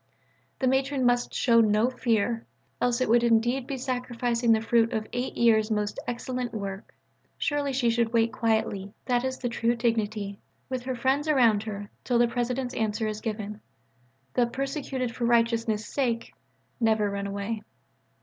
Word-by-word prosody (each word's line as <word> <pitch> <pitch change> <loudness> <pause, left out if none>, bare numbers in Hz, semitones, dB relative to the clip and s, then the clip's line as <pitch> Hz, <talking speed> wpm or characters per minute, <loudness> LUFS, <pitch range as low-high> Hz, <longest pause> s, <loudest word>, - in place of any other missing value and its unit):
The 265 - -1
Matron 265 0 +1
must 245 0 +2
show 230 -2 +4
no 215 +3 +3
fear, 230 -2 0 0.3
else 245 0 +1
it - - +2
would 235 +2 +5
indeed 240 +3 +2
be 275 - -3
sacrificing 245 -2 0
the 220 - +5
fruit 230 +1 +2
of 220 -1 -1
eight 245 +1 -3
years' 220 -2 +4
most 210 -1 -1
excellent 245 0 -3
work. 200 -1 -6 0.4
Surely 290 -1 0
she 250 -3 +2
should 230 -1 +1
wait 230 0 +2
quietly 220 -4 -1
that 245 -1 +1
is 260 0 -2
the 245 - -3
true 235 0 +1
dignity 215 -4 -1 0.3
with 255 -1 -2
her 260 -1 -2
friends 265 +5 +1
around 240 -8 +4
her 205 -1 -6
till 245 - +1
the 240 0 +5
President's 245 +1 -2
answer 220 0 -1
is 215 0 -3
given. 210 -1 -4 0.7
The 245 -1 +3
"persecuted 265 -1 -3
for 240 - -1
righteousness' 230 -2 +2
sake" 235 -3 -2 0.5
never 220 -3 +2
run 200 0 -3
away. 200 +2 -3
235 Hz, 160 wpm, -27 LUFS, 220-250 Hz, 0.7 s, would